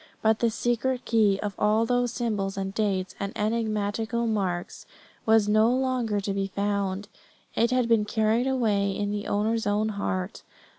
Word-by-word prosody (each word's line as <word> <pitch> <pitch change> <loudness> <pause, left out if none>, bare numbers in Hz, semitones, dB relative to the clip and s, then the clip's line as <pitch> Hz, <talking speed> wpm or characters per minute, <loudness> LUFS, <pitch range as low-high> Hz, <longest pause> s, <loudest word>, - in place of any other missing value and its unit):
But 220 0 +3
the 235 - +3
secret 240 +3 -1
key 210 -4 +3
of 205 -1 -2
all 215 +2 +3
those 245 0 +1
symbols 210 -5 -2
and 195 0 -3
dates 195 -3 -1
and 200 0 -4
enigmatical 220 +1 -1
marks 190 -6 -2 0.4
was 220 -2 +5
no 215 +2 +4
longer 250 -4 0
to 200 0 -2
be 195 0 -1
found; 200 0 -2 0.5
it 235 - +2
had 255 -1 +1
been 225 -3 +3
carried 220 +3 +1
away 215 -7 +1
in 205 0 -1
the 205 0 -3
owner's 220 +2 0
own 210 +1 +1
heart. 200 -1 -3
215 Hz, 160 wpm, -26 LUFS, 200-230 Hz, 0.5 s, was